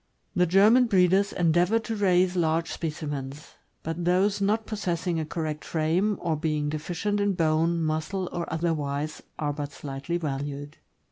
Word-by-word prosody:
The 180 Hz, -1 st, +3 dB
German 215 Hz, +8 st, +5 dB
breeders 195 Hz, -1 st, +3 dB
endeavor 175 Hz, +5 st, +3 dB
to 225 Hz, 0 st, -3 dB
raise 185 Hz, -3 st, +3 dB
large 165 Hz, -1 st, +1 dB
specimens; 150 Hz, -3 st, -5 dB, 0.3 s
but 165 Hz, +2 st, -3 dB
those 195 Hz, +4 st, +2 dB
not 215 Hz, +3 st, +1 dB
possessing 175 Hz, -5 st, -2 dB
a 155 Hz, -, -3 dB
correct 155 Hz, -2 st, -3 dB
frame, 175 Hz, +6 st, 0 dB
or 165 Hz, -2 st, 0 dB
being 150 Hz, -1 st, -1 dB
deficient 175 Hz, +7 st, -2 dB
in 205 Hz, -1 st, +2 dB
bone, 165 Hz, 0 st, +1 dB
muscle, 160 Hz, +4 st, -1 dB
or 170 Hz, -1 st, -4 dB
otherwise, 155 Hz, -2 st, -2 dB, 0.2 s
are 145 Hz, -1 st, -1 dB
but 145 Hz, -1 st, -5 dB
slightly 140 Hz, +4 st, -4 dB
valued. 145 Hz, -1 st, -4 dB
165 Hz, 145 wpm, -26 LUFS, 155-185 Hz, 0.3 s, German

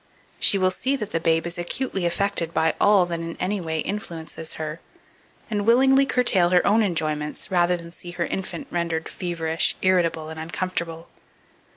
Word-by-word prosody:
She 200 Hz, -, +4 dB
will 185 Hz, -1 st, +2 dB
see 260 Hz, +9 st, 0 dB
that 215 Hz, -5 st, -5 dB
the 165 Hz, -, 0 dB
babe 165 Hz, 0 st, +2 dB
is 175 Hz, 0 st, -4 dB
acutely 190 Hz, 0 st, -1 dB
affected 170 Hz, -2 st, -1 dB
by 160 Hz, -, +3 dB
all 205 Hz, -3 st, +5 dB
that 170 Hz, -1 st, -3 dB
in 165 Hz, 0 st, -6 dB
any 195 Hz, +2 st, -1 dB
way 160 Hz, -2 st, -2 dB
influences 165 Hz, -5 st, -5 dB
her, 155 Hz, 0 st, -5 dB, 0.7 s
and 210 Hz, -3 st, -1 dB
willingly 265 Hz, +4 st, +5 dB
curtail 195 Hz, -10 st, +3 dB
her 180 Hz, 0 st, +4 dB
own 215 Hz, +3 st, +4 dB
enjoyments, 155 Hz, -5 st, -1 dB
rather 180 Hz, -1 st, +3 dB
than 170 Hz, 0 st, -9 dB
see 175 Hz, +1 st, -11 dB
her 175 Hz, -1 st, -2 dB
infant 190 Hz, +9 st, -4 dB
rendered 170 Hz, -2 st, -1 dB
feverish, 165 Hz, -3 st, -1 dB
irritable, 170 Hz, -4 st, +2 dB
and 160 Hz, 0 st, -7 dB
uncomfortable. 170 Hz, 0 st, -4 dB
175 Hz, 170 wpm, -24 LUFS, 165-200 Hz, 0.7 s, all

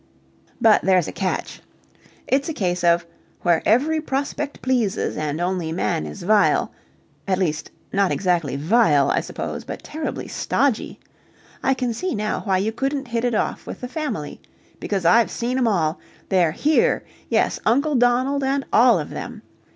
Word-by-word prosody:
But 220 Hz, -2 st, +5 dB
there's 185 Hz, -3 st, +3 dB
a -, -, -4 dB
catch. 190 Hz, -2 st, -3 dB, 0.6 s
It's 275 Hz, +3 st, +1 dB
a 320 Hz, -, -4 dB
case 180 Hz, -2 st, -1 dB
of 170 Hz, 0 st, +3 dB, 0.4 s
"Where 170 Hz, -2 st, +2 dB
every 300 Hz, +8 st, +3 dB
prospect 285 Hz, 0 st, -3 dB
pleases 245 Hz, -6 st, 0 dB
and 150 Hz, 0 st, -3 dB
only 175 Hz, -2 st, -1 dB
man 105 Hz, -, -1 dB
is 75 Hz, -, -8 dB
vile." 210 Hz, +2 st, +3 dB, 0.6 s
At 190 Hz, -1 st, +1 dB
least, 160 Hz, -4 st, -1 dB, 0.2 s
not 200 Hz, -1 st, +2 dB
exactly 175 Hz, -8 st, 0 dB
vile, 150 Hz, -, +3 dB
I -, -, +2 dB
suppose, -, -, -5 dB
but -, -, -7 dB
terribly 310 Hz, 0 st, -5 dB
stodgy. 275 Hz, -6 st, -1 dB, 0.6 s
I 265 Hz, -, +2 dB
can 250 Hz, -2 st, -1 dB
see 365 Hz, +7 st, -3 dB
now 215 Hz, 0 st, -1 dB
why 190 Hz, -2 st, +2 dB
you 205 Hz, +4 st, 0 dB
couldn't 270 Hz, +2 st, -2 dB
hit 230 Hz, 0 st, -1 dB
it 245 Hz, -2 st, +1 dB
off -, -, -2 dB
with -, -, -7 dB
the 250 Hz, -, -4 dB
Family. 305 Hz, +4 st, -4 dB, 0.4 s
Because 195 Hz, -4 st, -2 dB
I've 230 Hz, +7 st, +5 dB
seen 250 Hz, +2 st, -2 dB
'em 245 Hz, -, +2 dB
all! 170 Hz, -6 st, +1 dB, 0.3 s
They're 175 Hz, -5 st, +3 dB
here! 315 Hz, -, +2 dB, 0.3 s
Yes, -, -, +1 dB
Uncle 280 Hz, +7 st, +2 dB
Donald 255 Hz, +3 st, +2 dB
and 275 Hz, +1 st, 0 dB
all 240 Hz, +1 st, +6 dB
of -, -, -5 dB
them. -, -, -7 dB
220 Hz, 165 wpm, -22 LUFS, 180-265 Hz, 0.6 s, all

